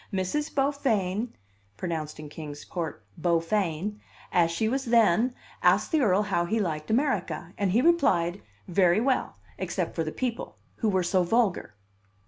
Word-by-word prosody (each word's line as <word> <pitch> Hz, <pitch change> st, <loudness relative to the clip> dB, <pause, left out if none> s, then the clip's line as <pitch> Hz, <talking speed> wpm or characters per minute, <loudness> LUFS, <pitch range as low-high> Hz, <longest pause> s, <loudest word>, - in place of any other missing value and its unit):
Miss 185 Hz, -2 st, -1 dB, 0.2 s
Beaufain 245 Hz, -7 st, 0 dB, 0.5 s
(pronounced 155 Hz, +1 st, -4 dB
in 155 Hz, -, -7 dB
Kings 145 Hz, -1 st, -8 dB
Port, 160 Hz, -, -5 dB
Bowfayne), 175 Hz, +3 st, 0 dB, 0.3 s
as 170 Hz, -2 st, +4 dB
she 170 Hz, +6 st, 0 dB
was 265 Hz, +4 st, -1 dB
then, 230 Hz, +1 st, +3 dB, 0.3 s
asked -, -, +3 dB
the 315 Hz, -3 st, +3 dB
Earl 205 Hz, -4 st, +3 dB
how 195 Hz, -4 st, 0 dB
he 220 Hz, +6 st, 0 dB
liked 155 Hz, -6 st, -2 dB
America; 220 Hz, -, 0 dB
and 200 Hz, -2 st, 0 dB
he 235 Hz, +6 st, +3 dB
replied, 195 Hz, -, +3 dB, 0.3 s
very 180 Hz, +1 st, +3 dB
well, 255 Hz, +2 st, 0 dB, 0.2 s
except -, -, -2 dB
for 165 Hz, -, -1 dB
the 155 Hz, -, -4 dB
people, 245 Hz, +2 st, -4 dB, 0.2 s
who 220 Hz, -, +1 dB
were 190 Hz, -2 st, +2 dB
so 185 Hz, +2 st, +2 dB
vulgar. 190 Hz, -, +1 dB
190 Hz, 150 wpm, -27 LUFS, 170-230 Hz, 0.5 s, as